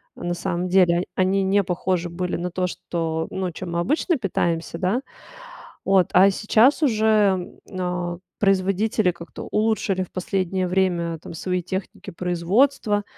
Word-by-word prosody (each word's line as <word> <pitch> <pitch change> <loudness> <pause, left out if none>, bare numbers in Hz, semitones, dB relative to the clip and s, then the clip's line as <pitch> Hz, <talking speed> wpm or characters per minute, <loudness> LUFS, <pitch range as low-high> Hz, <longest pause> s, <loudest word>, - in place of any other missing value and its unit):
а, - - -10
на 175 - -1
самом 175 0 -2
деле. 180 -1 +4
Они 190 +1 +2
не 200 +1 +3
похожи 180 -1 -1
были 180 +1 -3
на 180 +1 -4
то, 180 +1 -1
что, 165 -2 -3
ну, 185 -1 -2
чем 175 +1 -7
мы 170 - 0
обычно 305 - +1
питаемся, 170 -6 -1
да. 190 +8 0 0.8
Вот, 190 -2 +4
а 195 +2 +7
сейчас 225 +9 +3
уже, 215 -7 +2 0.2
а, 180 -1 -2 0.2
производители 195 0 +2
как-то 170 0 -10
улучшили 210 -3 0
в 185 - -12
последнее 185 0 -1
время 175 -3 0
там - - -10
свои 180 +2 -2
техники 190 +2 -5
производства. 205 +6 +1
185 Hz, 145 wpm, -23 LUFS, 175-195 Hz, 0.8 s, а